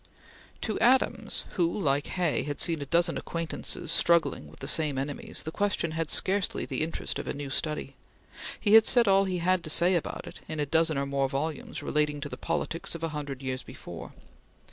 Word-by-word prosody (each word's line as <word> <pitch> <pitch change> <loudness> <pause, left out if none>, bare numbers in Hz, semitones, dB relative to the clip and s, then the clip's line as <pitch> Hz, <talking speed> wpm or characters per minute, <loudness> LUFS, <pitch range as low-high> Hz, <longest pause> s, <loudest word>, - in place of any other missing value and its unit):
To 215 - -2
Adams, 255 +3 +2
who, 175 +2 0
like 145 -4 +1
Hay, 175 -4 +1
had 145 -1 -4
seen 165 -4 +2
a 140 - -5
dozen 170 +3 +2
acquaintances 165 0 -3
struggling 170 -1 +2
with - - -16
the - - -6
same 150 -4 +2
enemies, 140 +1 -4
the 160 - -5
question 200 -4 0
had 160 -1 -2
scarcely 195 +1 +1
the - - -3
interest 160 +1 -3
of - - -6
a - - -3
new 140 -1 -5
study. 150 -2 -3 0.6
He 205 - +2
had 220 0 +9
said 240 -3 +5
all 195 0 +5
he 185 -1 -1
had 180 +1 +1
to - - -4
say 175 +4 +5
about 170 - -2
it - - -9
in 155 - -5
a 145 - +1
dozen 160 +1 +2
or 140 - 0
more 140 -1 0
volumes 145 +2 -3
relating 150 -1 0
to 145 - -4
the - - -6
politics 165 0 -3
of 165 - -7
a 165 - 0
hundred 145 -3 -5
years 130 -1 -3
before. - - -9
160 Hz, 205 wpm, -28 LUFS, 145-175 Hz, 0.6 s, had